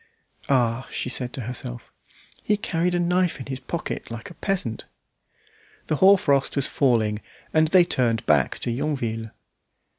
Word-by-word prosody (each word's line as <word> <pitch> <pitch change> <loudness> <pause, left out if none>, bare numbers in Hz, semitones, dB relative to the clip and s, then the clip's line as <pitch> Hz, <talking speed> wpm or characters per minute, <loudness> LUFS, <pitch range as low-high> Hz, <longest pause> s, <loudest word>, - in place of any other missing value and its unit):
"Ah!" 125 -2 +1
she - - -3
said 125 -1 -2
to 130 - -5
herself, 110 - -6 0.5
"he 210 - +1
carried 175 -2 0
a - - +1
knife 180 -1 +1
in 130 - -6
his 130 -1 -5
pocket 155 +5 -5
like 115 -1 -7
a - - -10
peasant." 165 - -2 1.0
The 155 - -1
hoar 195 +4 +7
frost 140 -6 +1
was 140 -2 +2
falling, 110 -6 +1 0.3
and 155 0 +4
they 180 +2 +6
turned 115 -8 +1
back 75 -4 +2
to 120 - -1
Yonville. 115 -5 -2
130 Hz, 155 wpm, -24 LUFS, 115-170 Hz, 1.0 s, hoar